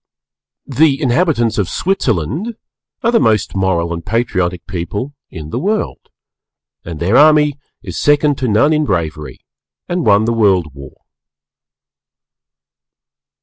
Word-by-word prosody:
_ -, -, -7 dB
The 145 Hz, -3 st, +4 dB
inhabitants 125 Hz, -6 st, +1 dB
of 100 Hz, -, -1 dB
Switzerland 165 Hz, -, -1 dB, 0.5 s
are 230 Hz, -, +2 dB
the 235 Hz, -, +3 dB
most 110 Hz, -4 st, +1 dB
Moral 85 Hz, -3 st, 0 dB
and 85 Hz, 0 st, -6 dB
Patriotic 95 Hz, -5 st, -1 dB
people 100 Hz, -, -5 dB, 0.2 s
in 80 Hz, -2 st, -9 dB
the -, -, -2 dB
World 210 Hz, +3 st, -3 dB, 0.7 s
and 80 Hz, -3 st, -7 dB
their 95 Hz, +7 st, +1 dB
army 150 Hz, -1 st, +4 dB, 0.2 s
is -, -, -6 dB
second 145 Hz, -1 st, +2 dB
to 130 Hz, -, -1 dB
none 120 Hz, +8 st, +3 dB
in 155 Hz, 0 st, +1 dB
bravery 75 Hz, -, -3 dB, 0.5 s
and 175 Hz, -1 st, -2 dB
won 105 Hz, -1 st, +3 dB
the 115 Hz, -, 0 dB
World 95 Hz, -, +2 dB
War. 70 Hz, -1 st, -11 dB
110 Hz, 130 wpm, -16 LUFS, -, 0.7 s, The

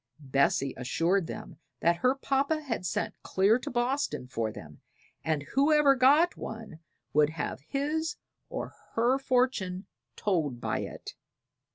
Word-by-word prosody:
Bessie 140 Hz, -1 st, +1 dB
assured 165 Hz, +8 st, +1 dB
them -, -, -8 dB, 0.2 s
that 170 Hz, +1 st, +3 dB
her 255 Hz, +7 st, +2 dB
papa 275 Hz, +3 st, 0 dB
had 230 Hz, -9 st, -2 dB
sent -, -, -1 dB
clear 200 Hz, +5 st, +3 dB
to -, -, -5 dB
Boston 245 Hz, -, -1 dB
for 115 Hz, -3 st, -2 dB
them, 75 Hz, -7 st, -11 dB, 0.4 s
and 155 Hz, -3 st, 0 dB
whoever 290 Hz, 0 st, +5 dB
got 285 Hz, +7 st, +5 dB
one 220 Hz, -7 st, -7 dB, 0.3 s
would 150 Hz, 0 st, +5 dB
have 155 Hz, -3 st, -4 dB
his 305 Hz, +4 st, -1 dB, 0.3 s
or -, -, -5 dB, 0.2 s
her 245 Hz, +4 st, +3 dB
fortune 245 Hz, -8 st, 0 dB, 0.3 s
told 155 Hz, -, 0 dB
by -, -, -1 dB
it. -, -, -7 dB
220 Hz, 135 wpm, -29 LUFS, -, 0.4 s, whoever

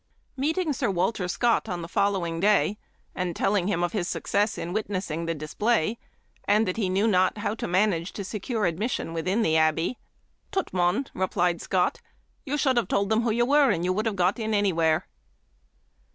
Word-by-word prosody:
Meeting 315 Hz, +4 st, 0 dB
Sir 245 Hz, -3 st, -1 dB
Wal 180 Hz, +2 st, +1 dB
ter 190 Hz, -5 st, -4 dB
Scott 230 Hz, +4 st, +1 dB
on 175 Hz, -2 st, -3 dB
the -, -, -6 dB
following 175 Hz, -3 st, 0 dB
day, 210 Hz, +1 st, +2 dB, 0.3 s
and 180 Hz, -2 st, -3 dB
telling 195 Hz, -3 st, +1 dB
him 175 Hz, -4 st, 0 dB
of 175 Hz, -, 0 dB
his 185 Hz, -5 st, -2 dB
success 205 Hz, +1 st, 0 dB
in 175 Hz, -, -4 dB
witnessing 185 Hz, -6 st, -3 dB
the 165 Hz, -, -1 dB
display, 210 Hz, +7 st, 0 dB, 0.5 s
and 215 Hz, +2 st, +3 dB
that 185 Hz, -, -1 dB
he 200 Hz, -5 st, 0 dB
knew 195 Hz, +4 st, +2 dB
not 185 Hz, -1 st, +2 dB
how 205 Hz, 0 st, -2 dB
to 225 Hz, -, -4 dB
manage 180 Hz, -1 st, +1 dB
to 200 Hz, -, -5 dB
secure 210 Hz, +2 st, -2 dB
admission 175 Hz, 0 st, -2 dB
within 185 Hz, +7 st, 0 dB
the 160 Hz, -, +2 dB
Abbey, 160 Hz, +8 st, +1 dB, 0.5 s
"Tut, 385 Hz, -2 st, -2 dB
mon," 180 Hz, +8 st, +1 dB
re 190 Hz, 0 st, 0 dB
plied 175 Hz, -3 st, 0 dB
Scott, 180 Hz, -2 st, 0 dB, 0.5 s
"you 290 Hz, +2 st, -1 dB
should 265 Hz, -3 st, +2 dB
have 235 Hz, -, +2 dB
told 200 Hz, +1 st, 0 dB
them 220 Hz, +1 st, +3 dB
who 235 Hz, -, 0 dB
you 235 Hz, +2 st, +2 dB
were, 285 Hz, +1 st, +4 dB
and 175 Hz, -5 st, 0 dB
you 185 Hz, -, +1 dB
would 215 Hz, +4 st, -1 dB
have 215 Hz, -, -1 dB
got 185 Hz, +4 st, +1 dB
in 220 Hz, -1 st, -1 dB
any 205 Hz, -2 st, +2 dB
where." 160 Hz, 0 st, +2 dB
200 Hz, 200 wpm, -26 LUFS, 175-220 Hz, 0.5 s, were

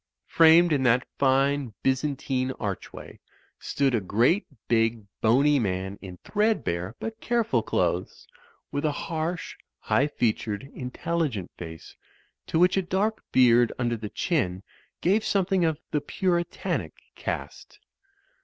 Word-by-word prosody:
Framed 165 Hz, +1 st, +6 dB
in 140 Hz, -, +1 dB
that 125 Hz, 0 st, +3 dB
fine 135 Hz, -3 st, +2 dB
Byzantine 130 Hz, -1 st, 0 dB
archway 100 Hz, -6 st, -6 dB, 0.4 s
stood 140 Hz, -2 st, 0 dB
a 115 Hz, -, +1 dB
great 120 Hz, -, +2 dB, 0.2 s
big, 115 Hz, -1 st, +1 dB, 0.2 s
boney 140 Hz, +6 st, +4 dB
man 95 Hz, -2 st, -2 dB
in 90 Hz, -2 st, -9 dB
threadbare 120 Hz, -, 0 dB
but 225 Hz, 0 st, -6 dB
careful 230 Hz, -, +1 dB
clothes, 90 Hz, -4 st, -2 dB, 0.4 s
with 145 Hz, -, -2 dB
a 155 Hz, -, +2 dB
harsh, 165 Hz, +3 st, -4 dB, 0.2 s
high 140 Hz, -, +1 dB
featured, 110 Hz, -5 st, -1 dB
intelligent 130 Hz, -, -3 dB
face, 80 Hz, -2 st, -10 dB, 0.5 s
to -, -, 0 dB
which 180 Hz, +3 st, +4 dB
a -, -, +3 dB
dark 195 Hz, +4 st, -1 dB
beard 120 Hz, -2 st, +5 dB
under 120 Hz, -1 st, 0 dB
the 110 Hz, -2 st, -6 dB
chin 105 Hz, -, -1 dB, 0.4 s
gave 205 Hz, +5 st, +2 dB
something 195 Hz, -2 st, +1 dB
of 160 Hz, -2 st, 0 dB
the 150 Hz, -, 0 dB
Puritanic 175 Hz, +3 st, -2 dB, 0.2 s
cast. -, -, -6 dB
135 Hz, 125 wpm, -26 LUFS, 110-170 Hz, 0.5 s, Framed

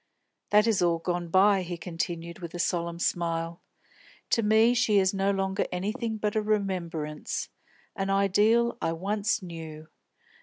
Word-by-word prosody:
"That 210 Hz, +1 st, +5 dB
is 220 Hz, -5 st, +2 dB
all 170 Hz, -1 st, +3 dB
gone 175 Hz, +1 st, -3 dB
by," 195 Hz, +3 st, +4 dB
he 175 Hz, -1 st, -5 dB
continued, 170 Hz, 0 st, -5 dB
with 170 Hz, -1 st, -7 dB
a -, -, -3 dB
solemn 170 Hz, -1 st, -1 dB
smile. 170 Hz, -1 st, -2 dB, 0.7 s
"To 230 Hz, -, +3 dB
me 220 Hz, +2 st, +4 dB
she 225 Hz, -4 st, +3 dB
is 190 Hz, 0 st, +3 dB
no 195 Hz, 0 st, +1 dB
longer 195 Hz, 0 st, 0 dB
anything 220 Hz, +5 st, -2 dB
but 210 Hz, 0 st, -2 dB
a 215 Hz, -, +2 dB
remembrance, 180 Hz, -8 st, -2 dB, 0.5 s
an 195 Hz, -1 st, -2 dB
ideal 210 Hz, +5 st, +3 dB
I 165 Hz, -, 0 dB
once 205 Hz, +4 st, -1 dB
knew. 160 Hz, -3 st, -8 dB
190 Hz, 150 wpm, -27 LUFS, 170-210 Hz, 0.7 s, That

